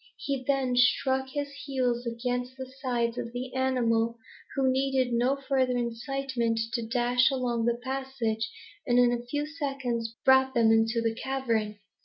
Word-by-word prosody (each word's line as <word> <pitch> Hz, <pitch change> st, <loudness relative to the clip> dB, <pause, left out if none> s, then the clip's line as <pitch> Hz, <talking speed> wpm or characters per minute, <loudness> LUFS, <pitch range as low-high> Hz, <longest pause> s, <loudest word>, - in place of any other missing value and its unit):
He 275 Hz, -2 st, -3 dB
then 270 Hz, -3 st, +1 dB
struck 265 Hz, +1 st, +3 dB
his 285 Hz, +1 st, -3 dB
heels 250 Hz, -3 st, -1 dB
against 245 Hz, +2 st, -3 dB
the 260 Hz, -, -5 dB
sides 245 Hz, -3 st, -2 dB
of 235 Hz, -1 st, -5 dB
the 250 Hz, +1 st, -5 dB
animal, 235 Hz, -3 st, +1 dB, 0.4 s
who 270 Hz, -1 st, +2 dB
needed 265 Hz, -1 st, +1 dB
no 245 Hz, +3 st, +2 dB
further 265 Hz, -2 st, 0 dB
incitement 240 Hz, 0 st, -1 dB
to 235 Hz, -, 0 dB
dash 245 Hz, +2 st, +3 dB
along 245 Hz, -4 st, -1 dB
the 235 Hz, 0 st, +1 dB
passage, 260 Hz, -4 st, -2 dB, 0.4 s
and 245 Hz, -1 st, +3 dB
in 245 Hz, -1 st, +5 dB
a 240 Hz, 0 st, -2 dB
few 290 Hz, +5 st, -2 dB
seconds 260 Hz, -7 st, -3 dB
brought 265 Hz, 0 st, +5 dB
them 230 Hz, -2 st, +5 dB
into 225 Hz, +1 st, +3 dB
the 225 Hz, -1 st, +1 dB
cavern. 230 Hz, -5 st, -1 dB
250 Hz, 155 wpm, -28 LUFS, 235-265 Hz, 0.4 s, in